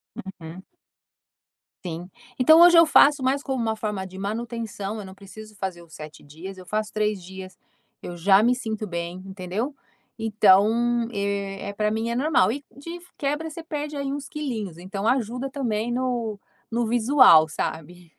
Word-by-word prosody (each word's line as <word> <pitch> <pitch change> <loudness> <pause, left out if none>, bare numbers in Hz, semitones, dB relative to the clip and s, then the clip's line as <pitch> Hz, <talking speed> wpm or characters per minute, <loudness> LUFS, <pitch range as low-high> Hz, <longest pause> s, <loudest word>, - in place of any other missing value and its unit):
Uhum. 185 -2 -9 1.2
Sim, 165 -3 -5 0.4
então 315 +6 +7
hoje 350 0 +8
eu 335 - +8
faço 290 -2 +5
mais 270 +2 +1
como 265 -2 -3
uma 220 -1 -1
forma 210 -3 -4
de 190 0 -11
manutenção, 220 -1 -4
eu 205 - -7
não 190 0 -11
preciso 210 +2 -12
fazer 190 -3 -5
os 170 -2 -17
7 155 0 -10
dias, 165 +7 -10
eu 185 - -11
faço 215 +2 -2
3 210 -3 -1
dias, 190 +1 -10 0.5
eu 175 - -6
já 195 +4 +5
me 245 +2 +4
sinto 220 -4 -4
bem, 170 0 -5
entendeu? 195 +7 -4 0.5
Então, 225 +3 +3
eh, 200 -1 -3
para 210 0 +1
mim 225 +1 -2
é 235 - -2
normal 265 -7 +3
e 280 +4 -5
de 335 +5 -8 0.2
quebra 295 +3 -2
você 325 +2 -9
perde, 300 -1 -5
aí, 280 -1 -3
uns 285 -1 -5
quilinhos, 225 - -4
então 195 +4 -4
ajuda 250 +1 0
também 240 -4 -2
no 240 -4 -2 0.3
no 235 +1 0
visual, 235 - +6
sabe? 160 +2 -6
215 Hz, 165 wpm, -24 LUFS, 190-255 Hz, 1.2 s, hoje